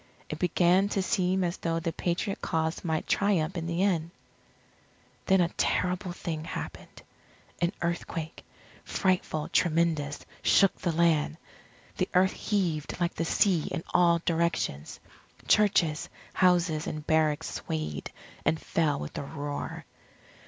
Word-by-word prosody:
It 155 - -5
began 180 +2 +3
to 195 - +2
seem 185 -2 +1
as 175 0 -1
though 165 0 -1
the 165 0 -3
Patriot 185 +3 -2
cause 160 +1 -1
might 160 -3 -1
triumph 190 -3 +1
in 165 -1 -3
the 170 +2 0
end. 170 -5 +1 1.2
Then 190 -1 +5
a 170 - +2
terrible 180 +1 0
thing 165 -3 -4
happened. 170 - -7 0.6
An 170 0 +2
earthquake 170 -1 -3 0.4
frightful, 180 -5 0
tremendous 160 -4 +1 0.2
shook 195 - +4
the 175 - +1
land. 160 -2 +2 0.6
The - - 0
earth 185 +1 +4
heaved 175 -7 -1
like 175 -1 0
the 165 - -2
sea 175 -1 +2
in 165 - -3
all 170 -1 +4
directions. 165 - -1 0.5
Churches, 175 -7 +3 0.2
houses, 175 -4 +2
and 155 -1 -5
barracks 155 -2 +1
swayed, 75 -1 -4 0.3
and 160 - +1
fell 155 -2 0
with 75 - -7
a - - -4
roar. 145 0 -5
170 Hz, 130 wpm, -28 LUFS, 155-180 Hz, 1.2 s, Then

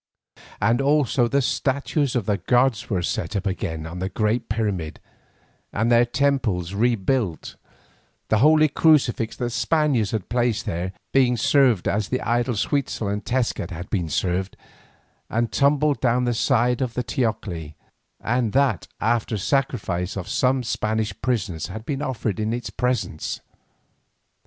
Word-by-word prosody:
Also 135 +2 +2
the 140 +3 +1
statues 140 +1 0
of 120 -5 0
the 105 -1 +1
gods 125 -1 +1
were 95 -5 0
set 105 - -2
up 100 - -2
again 90 -5 -3
on 85 +2 -7
the 95 +1 -2
great 110 +3 -1
pyramid 100 -8 -2 0.7
and 110 +3 0
their 120 0 +6
temples 120 -9 0
rebuilt, 110 -3 0 0.7
the 110 - +3
holy 155 +3 +6
crucifix 135 -7 +2
that - - -5
the - - -1
Spaniards 125 -2 +1
had 110 -4 -3
placed 120 -2 0
there 90 +3 -3 0.2
being 125 -2 +4
served 125 -4 +3
as 105 -1 0
the 130 - 0
idols 120 -1 0
Huitzel 135 -7 -1
and 105 +1 -2
Tezcat 115 -7 -1
had 90 0 -7
been 90 -6 -1
served, 95 +4 -1 0.7
and 115 +1 0
tumbled 140 -2 +2
down 125 0 +2
the 120 -1 +1
sides 120 +2 +2
of 125 -3 -2
the 125 - -1
teocalli, 105 - -3 0.4
and 120 -2 0
that 135 -9 +2
after 115 0 0
sacrifice 100 -7 -1
of 95 - -5
some 130 0 +1
Spanish 110 -2 -1
prisoners 95 -10 -1
had 110 +1 -8
been 140 +1 -3
offered 120 -7 -2
in 110 +1 -1
its 120 -1 -4
presence. 120 -11 -2
115 Hz, 145 wpm, -23 LUFS, 100-130 Hz, 0.7 s, their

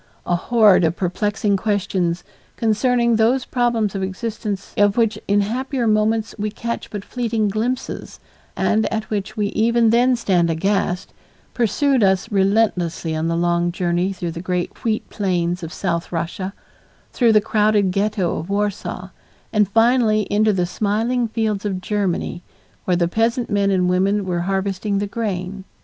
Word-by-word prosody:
A 175 - +1
horde 210 0 +4
of 165 0 +1
perplexing 205 +3 0
questions, 185 -4 -1 0.3
concerning 235 +1 +2
those 240 +4 +2
problems 235 -4 0
of 195 - -3
existence 200 +1 -4
of 205 +1 +3
which 225 -2 +2
in 205 +1 +3
happier 250 +4 -2
moments 215 0 +1
we 210 +1 -1
catch 235 +2 -5
but 205 -2 -6
fleeting 230 -4 -1
glimpses 235 +5 -3 0.4
and 220 0 +1
at 220 -1 -3
which 210 +1 -3
we 205 -1 0
even 230 +1 +2
then 245 +2 +4
stand 180 -7 +1
aghast, 180 +2 -1 0.4
pursued 260 +3 +2
us 190 +3 +2
relentlessly 190 -5 +1
on 160 +1 -1
the 165 0 0
long 175 0 +1
journey 175 +1 0
through 175 -3 -4
the 165 - -6
great 180 -1 -3
wheat 220 -2 -1
plains 180 -3 -1
of 165 -1 -6
South 170 -3 -2
Russia, 175 +3 -3 0.6
through 235 -3 +4
the 215 - +6
crowded 210 -2 +2
Ghetto 200 -2 0
of 165 - -7
Warsaw, 200 -2 -2 0.4
and 210 -2 +3
finally 225 -1 +3
into 215 +1 +3
the 180 -3 0
smiling 220 +6 0
fields 215 -3 -1
of 195 -3 -2
Germany 185 -3 -2 0.4
where 180 -1 +2
the 170 -1 +2
peasant 230 +5 0
men 200 -1 +2
and 185 -2 +2
women 195 +3 +1
were 180 -2 -1
harvesting 195 +1 -1
the 205 - 0
grain. 195 -3 -4
205 Hz, 155 wpm, -20 LUFS, 185-225 Hz, 0.6 s, the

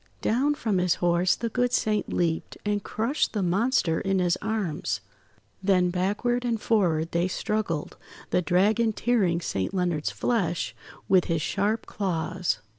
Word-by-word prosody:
Down 275 +6 +2
from 215 -9 0
his 180 -1 +2
horse 175 0 +2
the 235 - -3
good 245 +2 0
Saint 215 -3 0
leaped, 165 -2 -1
and 205 -1 0
crushed 235 +8 -1
the 205 -3 0
monster 185 -2 +1
in 195 -2 0
his 180 -1 +2
arms. 215 -7 -2 0.6
Then 185 -2 +3
backward 205 +7 0
and 235 -2 0
forward 170 -8 +1
they 170 +2 +1
struggled, 185 -5 -2 0.3
the - - +3
Dragon 210 +6 +2
tearing 200 -8 +1
Saint 95 - -2
Leonard's 175 -5 0
flesh 190 -8 -1 0.3
with 185 -2 +4
his 165 -2 -1
sharp 210 +3 0
claws. 180 - -2
190 Hz, 145 wpm, -26 LUFS, 175-220 Hz, 0.6 s, with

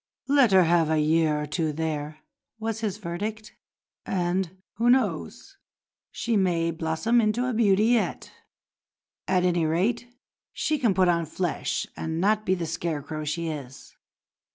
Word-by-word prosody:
"Let 275 -5 +4
her 190 -1 +6
have 165 -1 +3
a 160 - +2
year 155 0 +2
or 150 - -3
two 155 +1 -1
there," 155 0 -4 0.4
was 225 0 -3
his 210 -3 -2
verdict, 210 +4 -5 0.5
"and, 185 0 -1 0.2
who 235 +2 +2
knows, 245 - 0 0.5
she 230 -1 -2
may 170 -4 +1
blossom 165 +9 +1
into 220 +3 +1
a 255 - -1
beauty 210 -2 +3
yet. 235 -1 0 1.0
At 180 -1 +2
any 175 -3 +2
rate 200 +10 0 0.5
she 305 -1 -1
can 230 -8 +2
put 185 0 +4
on 170 -2 +1
flesh 175 +2 -2
and 160 0 -3
not 215 +3 +1
be 185 - +3
the 175 -2 -3
scarecrow 155 -2 -4
she 165 +2 -2
is." 135 -4 -8
180 Hz, 150 wpm, -26 LUFS, 160-215 Hz, 1.0 s, her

